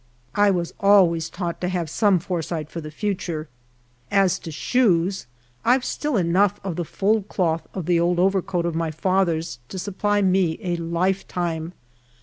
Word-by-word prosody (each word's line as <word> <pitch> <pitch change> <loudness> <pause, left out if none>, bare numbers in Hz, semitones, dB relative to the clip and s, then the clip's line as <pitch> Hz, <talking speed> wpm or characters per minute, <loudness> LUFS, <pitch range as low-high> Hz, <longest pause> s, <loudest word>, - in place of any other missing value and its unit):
I 205 +3 +4
was 175 -3 -1
always 180 -5 +4
taught 175 -2 -4
to 180 - 0
have 180 -2 -1
some 200 +4 +3
foresight 165 -3 -4
for 165 - -5
the 155 - -7
future. 170 -3 -3 0.6
As 195 -1 +3
to 165 - -8
shoes, 185 - +1 0.4
I've 250 +2 +3
still 295 -5 -1
enough 190 +3 +2
of 190 -4 -3
the 175 - -2
fulled 205 +4 0
cloth 165 -3 -1
of 185 -4 -3
the 175 0 +3
old 175 +1 +2
over 190 +2 +3
coat 175 -1 -2
of 170 - -1
my 165 0 -1
father's 165 -4 0
to 190 - -6
supply 205 +2 0
me 185 -4 +2
a 175 -2 -1
lifetime. 170 -1 -2
180 Hz, 165 wpm, -23 LUFS, 165-195 Hz, 0.6 s, I